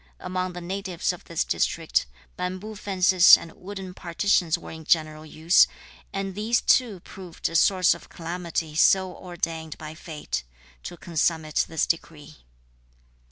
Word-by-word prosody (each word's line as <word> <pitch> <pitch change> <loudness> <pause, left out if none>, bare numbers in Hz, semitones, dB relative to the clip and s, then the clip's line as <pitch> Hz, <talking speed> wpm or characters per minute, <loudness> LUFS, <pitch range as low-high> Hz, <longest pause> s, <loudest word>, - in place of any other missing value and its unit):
Among 185 0 -3
the 180 - -7
natives 185 -1 -2
of 175 - -12
this 170 - -1
district - - 0 0.3
bamboo 185 +4 -5
fences 190 -2 +6
and 165 - -10
wooden 190 0 -8
partitions 175 -1 +1
were - - -10
in 160 0 -9
general 155 -1 0
use, 160 +3 +4 0.4
and 195 -1 -3
these 215 +4 +1
too 220 -8 +2
proved 180 -3 -6
a 165 - -8
source 185 +2 +4
of 170 - -12
calamity 170 -2 -4
so 185 +3 +3
ordained 165 -3 -5
by 155 0 -8
fate 155 - -5 0.4
(to 175 - -8
consummate 160 -2 0
this 160 - 0
decree). 155 -2 -4
175 Hz, 140 wpm, -25 LUFS, 160-185 Hz, 0.4 s, fences